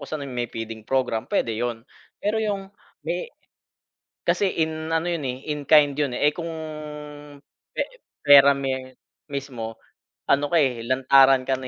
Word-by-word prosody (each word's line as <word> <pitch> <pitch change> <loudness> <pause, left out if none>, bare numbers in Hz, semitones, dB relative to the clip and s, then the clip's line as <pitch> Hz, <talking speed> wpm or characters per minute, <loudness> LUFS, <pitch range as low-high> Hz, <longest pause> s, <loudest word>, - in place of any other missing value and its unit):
kung - - -9
saan 145 -3 -5
may 120 -1 -2
feeding 115 -1 -7
program 130 -4 -1
puwede 115 - 0
'yon. 120 0 -3 0.4
Pero 215 +2 0
yung 200 -2 -3 0.3
may - - -3 1.0
kasi 200 -2 +2
in 160 0 -2
ano 165 +1 +1
yun, 165 -4 -2
eh, 125 -1 -3 0.2
in 150 - -6
kind 150 -2 +6
'yon, 145 -4 0
eh. 150 - +4
Eh, - - -9
kung 170 -1 -5 1.2
pe - - -1 0.4
pera 140 -1 +8
me 130 -1 -4 0.3
mismo 125 -5 -5 0.5
ano 145 +1 +3
ka, - - +5
eh, 120 -4 0
lantaran 130 0 +5
ka 135 - +2
na, 130 - -6
135 Hz, 160 wpm, -24 LUFS, 125-155 Hz, 1.2 s, pera